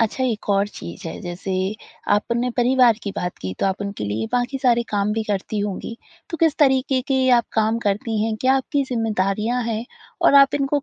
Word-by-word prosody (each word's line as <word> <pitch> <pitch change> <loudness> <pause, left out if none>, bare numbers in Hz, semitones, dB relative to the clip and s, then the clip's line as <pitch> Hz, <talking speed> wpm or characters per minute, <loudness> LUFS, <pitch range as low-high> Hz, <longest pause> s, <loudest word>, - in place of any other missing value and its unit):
अच्छा 230 +4 0
एक 225 -5 -2
और 200 0 +2
चीज़ 85 - -9
है - - -7
जैसे 180 +2 -4 0.6
आपने 235 +3 -1
परिवार 245 -2 +4
की 200 - -3
बात 180 0 -3
की 95 0 -4
तो - - +2
आप 190 +1 -1
उनके 200 - -4
लिए 105 +2 -2
बाकी 245 +2 0
सारे 240 -2 +3
काम 205 0 0
भी 220 +1 -1
करती 210 0 -2
होंगी 205 +3 -4 0.3
तो 330 - -3
किस 320 -2 +2
तरीके 265 -2 +3
के 260 -1 +2
आप 240 -2 +4
काम 220 +1 +1
करती 210 +1 -1
हैं, 220 -1 -1
क्या 260 +1 +4
आपकी 275 +1 -1
ज़िम्मेदारियाँ 225 0 -1
हैं? 230 0 -2 0.4
और - - +5
आप 275 0 +7
इनको 285 0 0
225 Hz, 200 wpm, -22 LUFS, 200-260 Hz, 0.6 s, आप